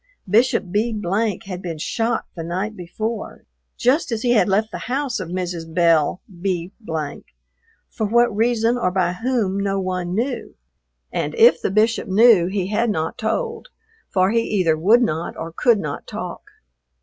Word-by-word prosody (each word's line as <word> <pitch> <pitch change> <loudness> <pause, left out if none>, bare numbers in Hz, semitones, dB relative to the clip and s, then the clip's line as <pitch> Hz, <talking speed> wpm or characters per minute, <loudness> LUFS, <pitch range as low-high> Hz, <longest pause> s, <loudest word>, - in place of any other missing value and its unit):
Bishop 205 -3 +2
B 215 +2 0 0.5
had 185 -2 -6
been 170 -3 -5
shot 225 +8 -1
the 170 - -5
night 190 +6 -3
before, 215 +5 -5 0.3
just 260 +3 +2
as 225 -1 -2
he 245 - +2
had 220 -3 +4
left 215 +3 +1
the - - -5
house 265 -2 -1
of 185 -3 -5
Mrs. 175 -2 -4
Belle 165 -1 +3 0.2
B, 180 -2 -2 1.2
for 220 - -3
what 235 0 +3
reason 230 +2 +2
or 180 - +1
by 180 -1 0
whom 220 -2 -1
no 195 0 0
one 185 -1 -2
knew; 245 +6 -3 0.6
and - - -2
if 470 +1 +6
the - - 0
Bishop 220 +3 +1
knew 200 -2 +5
he 190 -1 -2
had 225 +3 +1
not 160 -5 -2
told, 455 - -2 0.4
for 185 0 +2
he 230 0 +3
either 185 -8 +1
would 215 +10 +4
not 165 -6 -2
or 165 0 -6
could 235 -3 +4
not 150 -7 -5
talk. - - -7
205 Hz, 160 wpm, -21 LUFS, 180-230 Hz, 1.2 s, if